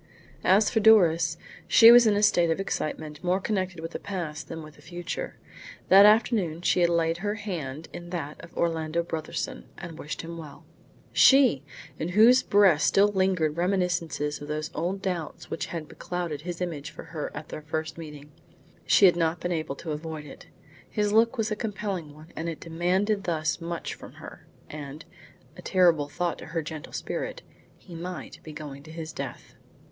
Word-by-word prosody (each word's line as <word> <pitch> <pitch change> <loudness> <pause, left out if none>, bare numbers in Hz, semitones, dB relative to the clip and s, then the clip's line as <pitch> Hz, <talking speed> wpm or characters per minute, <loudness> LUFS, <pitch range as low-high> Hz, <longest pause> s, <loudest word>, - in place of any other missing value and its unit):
As 205 +3 +5
for 225 - +2
Doris, 170 -7 +5 0.3
she 230 0 +9
was 240 -1 +8
in 210 - +4
a 205 - +1
state 175 -4 +4
of 165 - 0
excitement 155 -4 -4
more 180 +1 +1
connected 185 -4 -2
with 165 +1 -6
the - - -5
past 170 -6 -5
than 165 -1 -7
with 155 -1 -13
the - - -17
future. 175 - -6 0.5
That 200 +2 +9
afternoon 210 -7 +2
she - - +3
had 175 -1 +4
laid 165 -1 +1
her 205 +3 -2
hand 165 -9 -5
in 175 0 -8
that 160 -4 -5
of 170 - -13
Orlando 165 0 0
Brotherson, 170 - -4
and 170 -3 -9
wished 150 - -5
him 170 0 -7
well. 150 -3 -11 0.5
She! 265 - +6 0.4
in 160 - -2
whose 245 +4 +7
breast 195 -7 +4
still 200 +1 +4
lingered 185 -6 +1
reminiscences 170 -5 -1
of 145 - -7
those 150 0 -3
old 190 +4 -3
doubts 175 -5 -4
which - - -3
had 165 -3 -5
beclouded 170 -5 -5
his 175 +1 -6
image 155 -5 -4
for - - -10
her 155 -3 -5
at 150 +1 -7
their - - -6
first 160 +1 -4
meeting. 150 -2 -10 0.6
She 200 - +6
had 180 - +6
not 165 0 0
been 175 - -3
able 155 -4 -2
to 160 +2 -6
avoid 155 0 -5
it. - - -12 0.4
His 210 -1 0
look 230 +3 +4
was 220 -1 -1
a - - +1
compelling 200 -7 -4
one, 155 +3 -15
and 165 - -4
it 165 - -5
had 165 - -10
demanded 190 +5 +1
thus 160 0 -1
much 170 0 -4
from - - -12
her; - - -12 0.2
and 150 0 -8 0.5
a - - -11
terrible 170 -6 +3
thought 170 +3 -2
to - - -9
her 165 0 -3
gentle 155 +1 -7
spirit - - -4 0.3
he 180 - -14
might 175 +2 -7
be 155 - -10
going 145 -2 -8
to 155 +2 -13
his 160 -1 -7
death! 135 -3 -7
170 Hz, 190 wpm, -27 LUFS, 155-190 Hz, 0.6 s, she